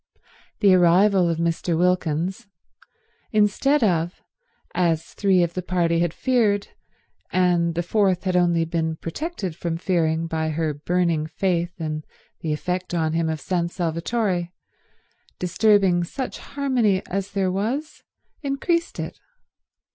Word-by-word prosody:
The 200 -3 +6
arrival 185 +1 +5
of 165 - 0
Mr. 170 0 0
Wilkins, 180 +3 0 0.8
instead 225 +7 +3
of, 175 -3 0 0.5
as 165 -3 0
three 190 -3 +3
of 170 0 -2
the 185 - -3
party 170 -2 +1
had 170 -1 +1
feared 215 -3 +1 0.6
and 175 -2 +2
the 175 - 0
fourth 190 -1 +1
had 185 -2 0
only 170 -2 +3
been 160 -1 -1
protected 190 - -5
from 165 0 -3
fearing 165 -2 0
by 160 -1 -2
her 155 0 -1
burning 165 +1 0
faith 175 +1 -1
in 155 -1 -3 0.4
the 160 - -3
effect 180 +4 -2
on 160 -2 0
him 165 -1 0
of 160 -1 -2
San 175 0 -1
Salvatore, 175 +2 -1 0.9
disturbing 185 -1 +3
such 260 +9 -5
harmony 250 -9 0
as 195 +1 -4
there 190 -2 +1
was, 240 +11 -3 0.4
increased 335 +5 -1
it. - - -5
180 Hz, 130 wpm, -23 LUFS, 165-200 Hz, 0.9 s, The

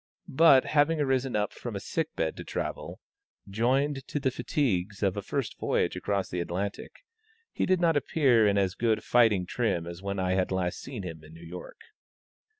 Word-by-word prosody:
But, 140 -3 +6
having 155 +2 +2
arisen 135 -3 0
up 105 -1 0
from 120 -4 -7
a - - -2
sick 160 +9 -3
bed 80 -1 -1
to - - -6
travel, - - -5 0.5
joined 130 +7 0
to 145 - -2
the 135 -2 0
fatigues 105 - -1
of 95 -1 +1
a 100 - -3
first 120 +1 -4
voyage - - 0
across 100 -2 -1
the 90 - -4
Atlantic, 100 - -5 0.5
he - - -1
did 185 -1 +3
not 170 -2 +3
appear 130 -6 +3
in 100 0 +2
as 95 -2 +1
good 110 0 0
fighting 110 -6 +3
trim 95 -5 -1
as 85 +1 -8
when 100 0 -3
I 95 -1 0
had 95 0 +1
last 90 -2 -1
seen 125 -7 -7
him 80 -3 -7
in 80 +1 -14
New 85 +1 -12
York. 90 +2 -10
105 Hz, 190 wpm, -28 LUFS, 95-135 Hz, 0.5 s, But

